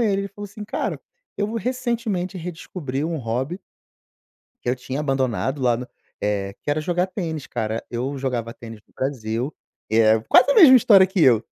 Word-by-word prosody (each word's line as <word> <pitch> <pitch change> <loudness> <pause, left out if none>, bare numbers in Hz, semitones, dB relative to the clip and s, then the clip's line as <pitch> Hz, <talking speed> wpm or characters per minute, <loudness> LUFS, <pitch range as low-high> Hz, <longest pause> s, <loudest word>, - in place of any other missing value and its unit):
ele. 200 -4 +1
Ele 200 - -5
falou 205 +1 -9
assim: 210 +1 -9
"Cara, - - -3 0.4
eu 210 +2 -2
recentemente 225 -6 -2
redescobri 160 -4 -5
um 165 0 -2
hobby" 130 - -3 1.0
"que - - -4
eu 130 - 0
tinha 130 +3 -5
abandonado 135 -1 -1
lá 120 -2 +3
no 125 +1 -7 0.3
eh, 100 -1 -1
que 145 - -2
era 150 - +1
jogar 175 +3 0
tênis, 165 -6 -5
cara. 110 +1 -3
Eu 125 +4 -3
jogava 120 -3 -2
tênis 115 -2 -10
no - - -31
Brasil", 125 0 -3 0.4
e 110 - +3
é 110 0 +5
quase 255 +3 +6
a - - +4
mesma 275 -9 +9
história 205 -6 +6
que 190 -1 -2
eu. 120 -6 +5
145 Hz, 180 wpm, -22 LUFS, 120-195 Hz, 1.0 s, mesma